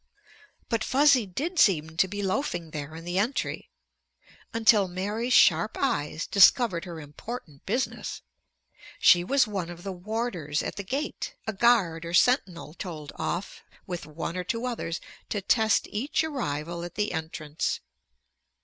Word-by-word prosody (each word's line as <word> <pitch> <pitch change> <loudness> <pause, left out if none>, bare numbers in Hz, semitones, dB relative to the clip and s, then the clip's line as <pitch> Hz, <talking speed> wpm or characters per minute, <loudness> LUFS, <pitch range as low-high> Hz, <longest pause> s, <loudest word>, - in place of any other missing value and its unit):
But 230 -2 0
Fuzzy 270 -4 +4
did 310 - -3
seem 160 - +3
to 190 - +4
be 205 +2 -4
loafing 185 - -2
there 150 0 -6
in 165 +1 -9
the 175 +2 -1
entry. 230 +7 -2 0.8
Until 220 -3 +4
Mary's 205 +7 -3
sharp 170 -3 +5
eyes 155 - -1
discovered 200 -2 +5
her 170 -3 -7
important 150 - -9
business. 245 +6 -2 0.7
She 175 0 +6
was 270 +8 +3
one 195 -6 -4
of 175 0 -9
the 195 - -4
warders 180 -6 -2
at - - -4
the 200 - -5
gate, 275 +10 -4
a 220 - -2
guard 195 -7 +3
or 170 +1 -2
sentinel 180 - +2
told 160 -6 -7
off, 175 +3 -3 0.2
with 175 -4 -5
one 165 +2 -5
or 180 - -2
two 230 +6 -2
others, 225 -9 -3 0.3
to 205 - -1
test 220 +2 +2
each 270 +9 0
arrival 170 - -3
at 175 - -7
the 210 0 0
entrance. 160 -2 -3
190 Hz, 150 wpm, -27 LUFS, 165-230 Hz, 0.8 s, She